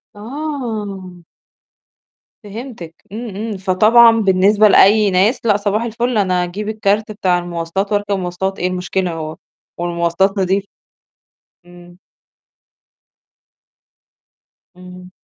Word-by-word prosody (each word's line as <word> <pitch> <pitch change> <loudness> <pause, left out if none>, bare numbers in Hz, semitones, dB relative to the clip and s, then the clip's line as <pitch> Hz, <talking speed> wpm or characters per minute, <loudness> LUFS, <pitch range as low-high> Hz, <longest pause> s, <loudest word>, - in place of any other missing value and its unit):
آه. 220 -7 -6 1.3
فهمتِك 205 -6 -9 0.2
إمم، 220 -2 -7
إمم، 215 0 -4
فطبعًا 215 +5 +5
بالنسبة 200 +1 +4
لأي 205 +1 +5
ناس 200 +7 +1
لأ 205 -2 +3
صباح 205 +2 -1
الفل 235 +1 -2
أنا 185 -3 +1
هاجيب 200 +4 -5
الكارت 215 0 0
بتاع 185 -4 0
المواصلات 175 +3 -4
وأركب 205 -1 0
مواصلات 185 +2 -3
إيه 180 - 0
المشكلة 180 -1 -2
هو 155 -1 -6 0.4
والمواصلات 175 +3 0
نضيفة. 195 +1 0 1.0
إمم. 175 0 -16 2.8
إمم. 180 0 -12
195 Hz, 100 wpm, -17 LUFS, 180-215 Hz, 2.8 s, فطبعًا